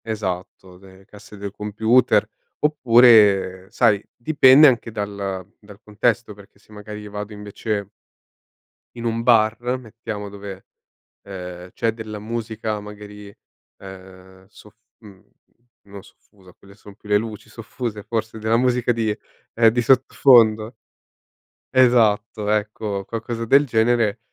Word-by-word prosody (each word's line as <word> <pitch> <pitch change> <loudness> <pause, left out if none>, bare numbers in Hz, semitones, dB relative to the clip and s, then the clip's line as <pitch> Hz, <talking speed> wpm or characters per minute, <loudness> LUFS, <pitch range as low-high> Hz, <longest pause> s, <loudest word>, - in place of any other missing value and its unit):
Esatto, 95 -3 -6
de 95 0 -18
casse 105 0 -15
del 100 0 -6
computer 110 +4 +1 0.4
oppure, 115 -9 +4
sai 100 -1 +2
dipende 135 +2 +5
anche 120 -3 +1
dal 100 -3 -5
dal 105 -1 -16
contesto, 110 +1 -1
perché 100 -1 -18
se 110 - -26
magari 105 0 -9
vado 105 +1 -7
invece 105 0 -5 1.1
in 120 -1 -7
un 115 0 -2
bar, 115 -2 +3 0.2
mettiamo 110 -3 -8
dove, 100 -1 -10 0.6
ehm, 90 -2 -9
c'è 115 -1 -1
della 110 -1 -8
musica 110 0 -4
magari, 105 -1 -12 0.4
ehm, 95 0 -14
sof 105 0 -18 0.2
mhmm, 100 -4 -17 0.6
no 100 -1 -12
soffusa, 95 -3 -22
quelle 100 +2 -19
son 100 -1 -15
più 105 - -18
le 105 - +3
luci 110 0 -5
soffuse 115 -1 -7
forse 110 0 -4
della 110 +1 +1
musica 125 -1 +1
di 110 -3 -2 0.4
ehm, 115 0 +5
di 120 +2 +1
sottofondo. 120 -3 +4 1.0
Esatto, 115 -4 +2
ecco, 105 -1 -2
qualcosa 115 +1 -5
del 140 +5 +4
genere, 115 -3 +1
105 Hz, 125 wpm, -21 LUFS, 100-115 Hz, 1.1 s, dipende